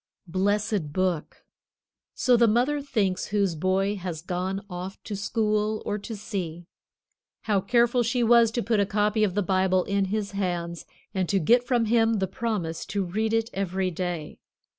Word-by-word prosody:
Blessed 200 -1 0
Book. 180 -2 -2 0.7
So 250 -1 +4
the 235 0 +5
mother 250 +7 +2
thinks 210 -10 -1
whose 200 -3 +1
boy 190 +5 0
has 175 -4 -5
gone 185 +2 -3
off 185 0 -6
to 210 - -5
school 215 +1 0
or 210 - -2
to 220 +2 -6
sea. 175 -5 -5 0.8
How 205 -3 +1
careful 240 +3 +3
she 240 +1 +1
was 235 0 +6
to 240 - -1
put 225 -2 +1
a 200 - +3
copy 210 +1 +1
of 195 -3 0
the 205 - +1
Bible 185 0 +2
in 200 0 0
his 205 +1 -2
hands 175 -3 -3 0.3
and 185 -3 -1
to 200 - +2
get 240 +8 +3
from 240 -3 +2
him 225 0 +3
the 195 -2 +1
promise 190 -5 -3
to 200 -2 -1
read 215 +5 -1
it 225 +1 0
every 190 -1 -1
day. 175 -3 -4
200 Hz, 170 wpm, -26 LUFS, 185-225 Hz, 0.8 s, was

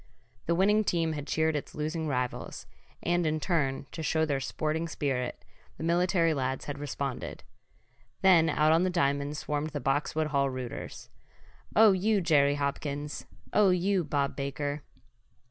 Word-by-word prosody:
The 170 - +2
winning 210 +4 +4
team 165 -4 0
had 145 -1 -5
cheered 160 0 +1
its 145 - -5
losing 155 +1 -2
rivals, 125 -3 -3 0.4
and 175 0 +1
in 155 -1 0
turn, 140 -6 0
to 160 - -6
show 160 0 +1
their 140 -3 0
sporting 155 +4 -2
spirit, 135 -5 -3 0.3
the - - -6
military 170 0 +2
lads 130 -2 -2
had 145 -1 -5
responded. 140 -2 -4 0.8
Then 170 -4 +6
out 155 +1 +3
on 165 +1 +4
the 185 - +2
diamond 145 -3 0
swarmed 150 +1 -2
the 145 - -4
Boxwood 145 +4 0
Hall 140 -2 +2
rooters. 130 -2 -7 0.6
"Oh 220 -1 +8
you 200 +3 +2
Jerry 145 -5 +3
Hopkins!" 145 +1 -3 0.3
"Oh 210 -2 +5
you 185 +1 +2
Bob 140 -3 -1
Baker!" 145 +1 -3
155 Hz, 150 wpm, -29 LUFS, 140-170 Hz, 0.8 s, Oh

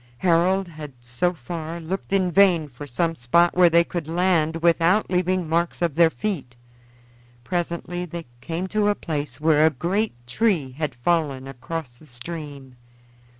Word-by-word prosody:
Harold 180 +4 +2
had 155 -4 -9
so 125 +8 -1
far 165 +2 -6
looked 180 +5 -5
in 190 -2 +2
vain 175 -4 +4
for 145 +2 -10
some 165 +6 0
spot 165 +6 +2
where 180 -1 +6
they 170 +1 +5
could 170 -2 -5
land 165 -2 +1
without 170 +5 +3
leaving 180 -1 +1
marks 170 +2 0
of 170 -4 0
their 165 +2 +5
feet. 160 -10 -4 0.9
Presently 175 +1 -3
they 170 0 -7 0.2
came 170 +2 -3
to 210 +2 0
a 205 - +2
place 150 -5 -4
where 155 0 +4
a 160 - +6
great 185 - -1
tree 160 - 0
had 145 -1 -4
fallen 135 -1 0
across 135 0 -6
the 155 - -17
stream. 140 0 -8
165 Hz, 155 wpm, -23 LUFS, 145-180 Hz, 0.9 s, where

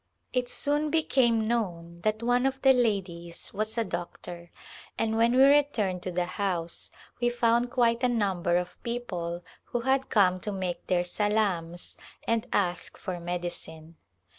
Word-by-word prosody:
It 250 -1 0
soon 295 +1 0
became 245 -8 +2
known 170 -7 -2
that 215 +3 0
one 245 +2 +3
of 270 0 -2
the 270 -1 +8
ladies 190 -8 -1
was 215 +3 -2
a 230 - +3
doctor 175 -2 -6 0.5
and 220 0 0
when 230 +2 +3
we 260 - +7
returned 270 -10 +3
to 185 - -3
the 175 0 0
house 180 -3 -2 0.3
we 240 0 +2
found 240 0 +2
quite 235 -2 +2
a 250 - +4
number 190 -7 +1
of 180 0 -4
people 180 -8 -4 0.2
who 240 - -2
had 265 +2 +1
come 185 -4 +4
to 210 - -4
make 185 -3 -4
their 175 -1 +2
salams 180 -3 -1 0.3
and 230 +1 0
ask 180 -3 -1
for 185 -2 -5
medicine. 170 -2 -5
210 Hz, 155 wpm, -28 LUFS, 175-240 Hz, 0.5 s, the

